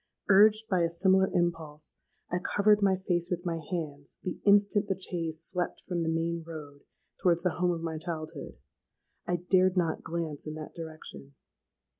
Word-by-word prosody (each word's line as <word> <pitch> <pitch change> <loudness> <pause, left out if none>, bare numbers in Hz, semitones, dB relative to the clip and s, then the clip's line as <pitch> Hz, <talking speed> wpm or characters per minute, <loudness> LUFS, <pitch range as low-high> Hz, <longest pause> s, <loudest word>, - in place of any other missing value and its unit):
Urged 215 +2 +6
by 185 -4 +2
a 170 - +2
similar 190 +2 +3
impulse, 160 -3 -2 0.4
I 180 - +1
covered 205 +3 +3
my 195 -1 +3
face 175 -2 -1
with 175 0 -3
my 170 -1 -1
hands 150 -3 -6
the 185 - -4
instant 205 0 +4
the 190 -2 -2
chaise 165 -4 -3
swept 180 -2 -3
from 175 -2 -3
the 165 - 0
main 165 +1 -1
road 150 -3 -9 0.4
towards 170 -2 +3
the 180 - 0
home 180 - +3
of 170 -2 -1
my 160 -1 -3
childhood. 160 -3 -6 0.7
I 175 - +1
dared 185 +1 +2
not 165 -3 +1
glance 160 -3 -4
in 155 - -5
that 155 -1 -8
direction! 155 -4 -9
170 Hz, 170 wpm, -29 LUFS, 160-185 Hz, 0.7 s, Urged